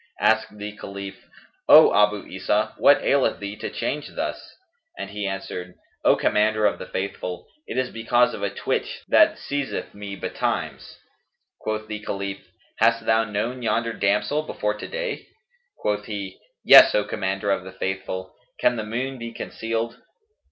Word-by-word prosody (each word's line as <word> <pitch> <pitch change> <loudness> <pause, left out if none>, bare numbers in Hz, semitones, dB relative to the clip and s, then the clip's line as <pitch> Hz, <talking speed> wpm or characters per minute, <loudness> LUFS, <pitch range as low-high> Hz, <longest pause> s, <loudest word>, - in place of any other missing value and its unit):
Asked 105 - +2
the 105 0 -6
Caliph, 100 -1 -8 0.4
"O - - +9
Abu 105 -1 +3
Isa, 105 +3 -1
what 145 - +6
aileth 140 -1 +2
thee 100 0 -5
to - - -4
change 150 0 -4
thus?"; - - -4 0.4
and 100 - -6
he 100 -1 -3
answered, 90 -2 -5 0.3
"O - - +6
Commander 110 0 +2
of 105 - +1
the - - -7
Faithful, 95 -2 -4 0.2
it - - -5
is 130 0 0
because 120 +2 +2
of - - -6
a - - 0
twitch - - -3
that - - +5
seizeth 140 -1 -4
me 100 -1 -7
betimes." - - -3 0.6
Quoth 110 0 -3
the 105 -1 -5
Caliph, 100 -1 -4 0.4
"Hast 115 0 +3
thou 110 0 +3
known 110 +5 -3
yonder 115 0 0
damsel 105 +9 +1
before 105 -8 -2
to 105 - -7
day?" - - -4 0.5
Quoth 105 0 -1
he, 100 -3 -6 0.3
"Yes, - - +9
O 105 - +3
Commander 100 -1 -2
of 95 - 0
the 95 - -9
Faithful, 95 -1 -4 0.3
can 120 - +3
the 110 - -2
moon 125 +5 -3
be 115 0 -6
concealed?" 115 0 -4
105 Hz, 160 wpm, -24 LUFS, 100-115 Hz, 0.6 s, O